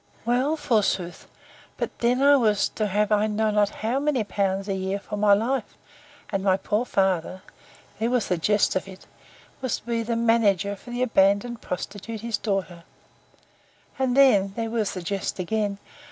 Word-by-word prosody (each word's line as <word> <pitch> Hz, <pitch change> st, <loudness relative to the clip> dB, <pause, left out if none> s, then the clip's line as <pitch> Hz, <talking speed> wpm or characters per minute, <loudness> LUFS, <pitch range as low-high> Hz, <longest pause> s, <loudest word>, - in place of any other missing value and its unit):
Well, 255 Hz, +6 st, +1 dB
forsooth! 200 Hz, -, -1 dB, 0.5 s
but -, -, -4 dB
then 245 Hz, +3 st, +2 dB
I 285 Hz, 0 st, +7 dB
was 215 Hz, -6 st, +2 dB
to 215 Hz, -, -2 dB
have 210 Hz, +1 st, 0 dB
I 210 Hz, 0 st, +3 dB
know 215 Hz, 0 st, 0 dB
not 205 Hz, -1 st, +2 dB, 0.2 s
how 245 Hz, +4 st, +1 dB
many 285 Hz, -5 st, 0 dB
pounds 195 Hz, -1 st, -1 dB
a 195 Hz, -, -1 dB
year 190 Hz, +1 st, -2 dB
for 210 Hz, -, -7 dB
my 205 Hz, -1 st, +5 dB
life; 245 Hz, +6 st, -2 dB, 0.5 s
and 195 Hz, -2 st, -1 dB
my 190 Hz, -1 st, +3 dB
poor 210 Hz, +4 st, -1 dB
father 190 Hz, -3 st, 0 dB, 0.6 s
(there 225 Hz, +2 st, 0 dB
was 245 Hz, -2 st, 0 dB
the 180 Hz, -, 0 dB
jest 205 Hz, +4 st, +2 dB
of 185 Hz, -, -2 dB
it!) 190 Hz, -1 st, -12 dB, 0.6 s
was 260 Hz, -2 st, -1 dB
to -, -, -29 dB
be 235 Hz, -1 st, -1 dB
the 230 Hz, +1 st, -2 dB
manager 210 Hz, -4 st, +2 dB
for 220 Hz, -, -15 dB
the 245 Hz, +1 st, -1 dB
abandoned 210 Hz, +1 st, +2 dB
prostitute 205 Hz, +4 st, -6 dB
his 230 Hz, -2 st, -2 dB
daughter: 190 Hz, -5 st, -3 dB, 1.2 s
And 260 Hz, -1 st, +1 dB
then, 200 Hz, -8 st, +5 dB
(there 225 Hz, -1 st, -3 dB
was 220 Hz, -4 st, -1 dB
the 185 Hz, -, -5 dB
jest 195 Hz, +2 st, -3 dB
again!) 200 Hz, +2 st, -1 dB
210 Hz, 175 wpm, -25 LUFS, 195-235 Hz, 1.2 s, I